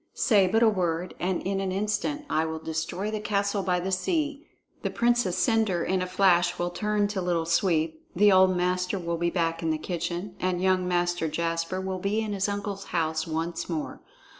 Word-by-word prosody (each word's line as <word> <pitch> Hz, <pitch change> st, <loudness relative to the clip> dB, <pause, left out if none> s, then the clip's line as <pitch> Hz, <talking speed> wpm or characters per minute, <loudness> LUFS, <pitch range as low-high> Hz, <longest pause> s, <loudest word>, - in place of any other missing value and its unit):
Say 205 Hz, -6 st, +4 dB
but 225 Hz, +5 st, +3 dB
a -, -, +6 dB
word, 180 Hz, -4 st, 0 dB
and 180 Hz, 0 st, -1 dB
in 195 Hz, 0 st, -1 dB
an 195 Hz, -1 st, -2 dB
instant 210 Hz, +10 st, -1 dB
I 160 Hz, -, +1 dB
will 160 Hz, 0 st, -4 dB
destroy 160 Hz, +6 st, -3 dB
the 215 Hz, -, -2 dB
castle 200 Hz, -1 st, 0 dB
by 180 Hz, -2 st, +1 dB
the 185 Hz, +2 st, -3 dB
sea. 295 Hz, -, -1 dB, 0.3 s
The -, -, -1 dB
Princess 235 Hz, -6 st, +1 dB
Cendre 220 Hz, -6 st, +2 dB
in 185 Hz, 0 st, +1 dB
a 185 Hz, -, -2 dB
flash 180 Hz, -2 st, +3 dB
will 175 Hz, 0 st, -1 dB
turn 210 Hz, +2 st, 0 dB
to 200 Hz, -2 st, -2 dB
Little 175 Hz, -2 st, 0 dB
Sweep; 165 Hz, -2 st, +1 dB
the 205 Hz, +3 st, +5 dB
old 185 Hz, -1 st, +5 dB
master 180 Hz, +2 st, 0 dB
will 170 Hz, -2 st, -2 dB
be 170 Hz, +1 st, +1 dB
back 165 Hz, -1 st, -1 dB
in 165 Hz, -, -1 dB
the 155 Hz, -, +1 dB
kitchen, 175 Hz, +3 st, -4 dB
and 185 Hz, -1 st, 0 dB
young 185 Hz, 0 st, +2 dB
Master 175 Hz, -2 st, 0 dB
Jasper 165 Hz, +3 st, -2 dB
will 190 Hz, 0 st, -3 dB
be 200 Hz, +4 st, 0 dB
in 215 Hz, -2 st, -2 dB
his 195 Hz, 0 st, 0 dB
uncle's 200 Hz, -1 st, -4 dB
house 160 Hz, -2 st, -1 dB
once 165 Hz, +2 st, -3 dB
more. 160 Hz, -3 st, -4 dB
185 Hz, 200 wpm, -27 LUFS, 170-200 Hz, 0.3 s, a